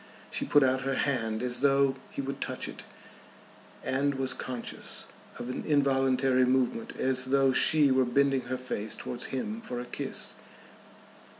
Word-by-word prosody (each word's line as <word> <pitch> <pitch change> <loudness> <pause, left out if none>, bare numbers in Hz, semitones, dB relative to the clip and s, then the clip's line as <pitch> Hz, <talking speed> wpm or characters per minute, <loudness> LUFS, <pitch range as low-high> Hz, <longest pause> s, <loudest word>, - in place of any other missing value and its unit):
She - - -1
put 145 - +5
out 130 0 +2
her 135 0 -1
hand 115 -5 0
as 125 -1 -1
though 140 -1 +4
he 140 - -4
would 135 +1 -5
touch - - -3
it, - - -8 1.0
and 140 +2 0
was 130 -1 0
conscious 125 -2 -5 0.3
of - - -6
an 125 - -4
involuntary 135 -3 +3
movement 125 -2 0
as 130 -1 0
though 135 0 +3
she 145 +1 +5
were 130 0 +4
bending 135 +1 +2
her 130 +1 -2
face 110 -4 -4
towards 120 0 -5
him 215 - -4
for 125 - -5
a 120 - -5
kiss. - - -3
130 Hz, 160 wpm, -29 LUFS, 125-140 Hz, 1.0 s, put